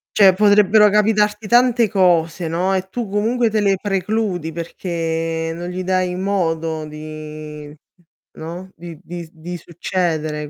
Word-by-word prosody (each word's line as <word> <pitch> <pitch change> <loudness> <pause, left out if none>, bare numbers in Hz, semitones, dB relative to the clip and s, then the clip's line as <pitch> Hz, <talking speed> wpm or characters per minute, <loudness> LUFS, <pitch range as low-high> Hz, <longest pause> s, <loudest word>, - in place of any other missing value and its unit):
Cioè 195 -3 +7
potrebbero 210 +1 +5
capitarti 210 0 +2
tante 240 0 +4
cose, 175 -4 +2
no, 180 +4 0
e 190 0 -3
tu 235 +3 -4
comunque 225 +4 +1
te 215 0 0
le 200 -1 +2
precludi 195 -4 -1
perché 165 -1 -3
non 175 +1 -5
gli 185 +1 -4
dai 185 -1 0
modo 165 -5 -1
di, 150 -1 -9 0.6
no, 175 +4 -8
di 165 -2 -10
di 175 -2 -8
di 170 +2 -8
succedere 160 -3 -3
180 Hz, 130 wpm, -19 LUFS, 165-205 Hz, 0.6 s, Cioè